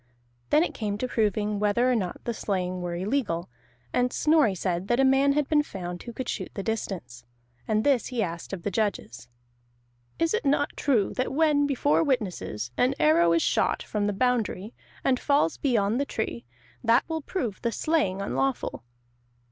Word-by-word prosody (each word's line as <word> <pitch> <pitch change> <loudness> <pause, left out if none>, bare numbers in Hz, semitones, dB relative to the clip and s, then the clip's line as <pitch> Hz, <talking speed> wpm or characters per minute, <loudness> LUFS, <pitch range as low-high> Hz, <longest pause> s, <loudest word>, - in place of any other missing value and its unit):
Then 305 - +5
it - - -3
came 205 -2 -3
to 255 - -2
proving 210 -2 0
whether 210 +5 +2
or - - +2
not 185 -6 -3
the 235 - -2
slaying 185 -4 -2
were 175 -1 -3
illegal, 185 - -1 0.4
and 250 0 +2
Snorri 300 -10 +3
said 180 0 -2
that 240 +3 +1
a 270 - +5
man 270 +1 +4
had 295 -1 +1
been 300 -1 +4
found 180 -9 -6
who 240 - -7
could 250 +1 -6
shoot - - -3
the 195 - -3
distance. 180 - -4 0.4
And 215 -1 +1
this 275 -5 +2
he 245 -4 -1
asked 170 -2 -5
of 190 -4 -5
the 205 - -2
judges: 175 - -2 0.9
"Is 330 +3 +1
it 445 - 0
not 285 0 +1
true 235 -9 +1
that 255 - 0
when, 295 -1 +3
before 285 +1 +2
witnesses, 185 - -2
an 255 +2 +2
arrow 165 +3 +4
is 165 - +2
shot - - +1
from 205 -1 -1
the - - +1
boundary 225 -2 0 0.3
and 255 -2 +2
falls 280 - +2
beyond 230 -2 +1
the - - 0
tree, 120 - -4 0.4
that 235 +2 +3
will 320 -1 -3
prove 255 - -4
the 235 - 0
slaying 210 - 0
unlawful?" 135 - -2
220 Hz, 180 wpm, -26 LUFS, 185-270 Hz, 0.9 s, Then